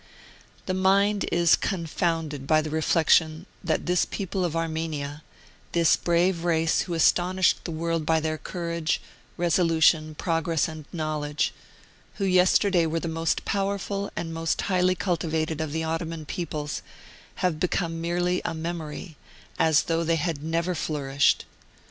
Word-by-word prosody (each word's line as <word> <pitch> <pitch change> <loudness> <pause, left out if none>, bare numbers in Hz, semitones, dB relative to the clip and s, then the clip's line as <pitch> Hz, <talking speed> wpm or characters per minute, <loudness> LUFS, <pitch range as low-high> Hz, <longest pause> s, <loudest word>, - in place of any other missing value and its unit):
*... - - -28
The 185 - -1
mind 195 +2 +3
is 170 -1 +5
confounded 165 -5 -2
by 155 +1 +4
the 155 - -5
reflection 160 +1 +2 0.2
that 165 -3 -1
this 180 0 +2
people 190 -1 -3
of 170 -2 -1
Armenia, 160 -3 -3 0.5
this 170 -2 +4
brave 170 0 +1
race 165 -1 +2
who 175 - -3
astonished 180 +3 +3
the 170 - -3
world 165 0 -1
by 160 +1 +2
their 155 0 -2
courage, 170 -1 -2 0.4
resolution, 165 -2 +3
progress 165 -1 0
and 155 -2 -8
knowledge, 155 -3 -2 0.6
who 200 - -2
yesterday 185 -1 +4
were 165 +1 -1
the 170 - -4
most 165 0 -1
powerful 200 0 -2
and 165 -1 -4
most 165 0 -1
highly 185 -1 +2
cultivated 160 -3 -1
of 155 -2 -3
the 160 +1 -2
Ottoman 165 0 -3
peoples, 150 -2 -4 0.6
have 165 -4 0
become 165 -1 -1
merely 175 +1 0
a - - -3
memory, 160 -1 -6 0.4
as 160 -2 +4
though 165 0 0
they 165 0 +2
had 165 -2 -2
never 165 +3 -1
flourished. 140 -3 +1
165 Hz, 140 wpm, -26 LUFS, 155-175 Hz, 0.6 s, is